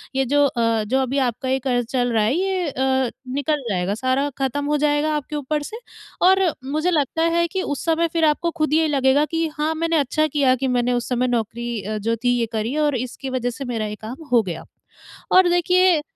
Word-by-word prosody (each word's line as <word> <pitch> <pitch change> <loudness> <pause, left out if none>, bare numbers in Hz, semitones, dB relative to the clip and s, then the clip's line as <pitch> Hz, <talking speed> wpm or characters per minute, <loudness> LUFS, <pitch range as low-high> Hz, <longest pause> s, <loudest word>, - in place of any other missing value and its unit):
ये 270 0 +2
जो 285 +3 +3
अ, 230 -4 +1
जो 260 +6 0
अभी 265 +1 -1
आपका 245 +2 -4
ये 265 0 +1
कर्ज़ 245 -2 +1
चल 245 -2 0
रहा 220 -2 +3
है, 225 +5 +2
ये 375 -1 0
अ, 265 -1 0 0.2
निकल 285 +1 0
जाएगा। 185 0 -1
सारा 265 +2 +1
खत्म 275 +1 -1
हो 295 +1 +1
जाएगा 295 +1 +1
आपके 300 0 -4
ऊपर 295 +1 -2
से 445 - -7 0.5
और 380 +1 +5 0.3
मुझे 310 +4 +1
लगता 320 0 0
है 340 0 +2
कि 380 +2 -3
उस 285 -4 -3
समय 330 0 +2
फिर 330 -1 +2
आपको 310 +3 +1
खुद 305 -1 +1
ये 320 0 +3
लगेगा 275 0 +3
कि, 325 +1 -1
"हाँ, 310 +2 0
मैंने 330 0 0
अच्छा 310 +2 +1
किया 275 -3 +2
कि 265 +1 -2
मैंने 245 0 +1
उस 240 -1 -1
समय 250 0 +1
नौकरी 235 -1 -2
अ, 215 +2 -4
जो 230 +2 -1
थी, 245 0 +2
ये 230 - +1
करी 225 +4 -2
और 285 - 0
इसकी 255 +2 -5
वज़ह 250 -1 -1
से 270 +3 -6
मेरा 220 -1 -2
ये 210 - -5
काम 255 +9 -7
हो 240 - +5
गया।" 175 -4 -6 0.7
और 370 -1 +6
देखिए, 355 -1 +3
270 Hz, 225 wpm, -21 LUFS, 245-310 Hz, 0.7 s, और